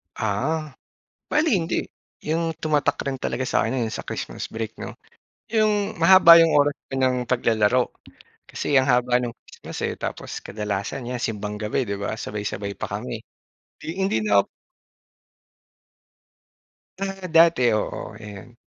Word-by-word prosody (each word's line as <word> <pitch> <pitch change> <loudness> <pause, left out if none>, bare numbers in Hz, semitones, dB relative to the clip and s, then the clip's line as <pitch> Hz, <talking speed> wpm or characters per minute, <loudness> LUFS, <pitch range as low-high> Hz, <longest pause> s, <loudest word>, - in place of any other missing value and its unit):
Ah, 145 +9 -1 0.6
bale 310 +1 +2
hindi. 175 -3 0 0.5
Yung 165 +1 -1
tumatak 150 -2 +1
rin 135 -1 -3
talaga 130 +2 -2
sa'kin 130 - 0
yung 110 - -4
sa - - -4
Christmas - - -5
break 110 0 -5
no. - - -7 0.6
Yung 215 -4 +1
mahaba 170 -1 +9
yung 165 -1 +4
oras 145 0 +4 0.2
pa - - -6
nang 130 -1 +1
paglalaro 120 0 +2 0.6
kasi 140 - +1
ang 130 - +2
haba 125 -1 +3
ng 120 -1 -4
Christmas - - -10
eh. - - -1
Tapos - - -5
kadalasan 105 +4 -4
yan 125 - -3
simbang 105 -3 -3
gabi, 110 +5 -1
'di 100 -3 -4
ba 100 +1 -2
sabay-sabay 105 -1 -4
pa - - -3
kami, - - -5 0.6
di 165 +5 -6
hindi 190 - +1
na 100 -1 +5 2.6
Ah, 195 -1 -4
dati 165 -3 +5 0.2
oo, 105 0 -5
ayon. 105 +2 -11
130 Hz, 140 wpm, -24 LUFS, 110-165 Hz, 2.6 s, mahaba